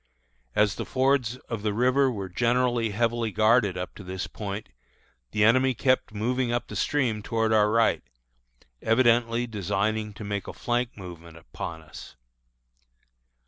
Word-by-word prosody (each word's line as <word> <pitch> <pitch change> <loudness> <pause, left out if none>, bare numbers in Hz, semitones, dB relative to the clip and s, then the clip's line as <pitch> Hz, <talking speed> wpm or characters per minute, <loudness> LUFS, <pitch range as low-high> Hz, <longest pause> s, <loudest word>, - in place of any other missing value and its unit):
As 105 -2 +3
the - - -4
fords 130 -2 +1
of 115 -3 -4
the 105 -1 -1
river 130 +3 +3
were 100 -6 -4
generally 120 +3 +1
heavily 115 +2 0
guarded 110 -2 +3
up 90 0 -5
to 100 - -11
this 95 0 -4
point, 100 0 -6 0.6
the 105 - +1
enemy 130 +3 +4
kept 130 +1 +1
moving 120 +4 -1
up 120 0 -1
the 105 - -7
stream 120 -1 0
toward 110 0 0
our 105 -1 +4
right, 115 +1 +3 0.8
evidently 120 0 +3
designing 105 0 -1
to 105 - -8
make 100 -1 -3
a - - -6
flank 120 -1 -2
movement 85 -3 -10
upon 80 +2 -7
us. 80 - -12
110 Hz, 145 wpm, -26 LUFS, 100-120 Hz, 0.8 s, enemy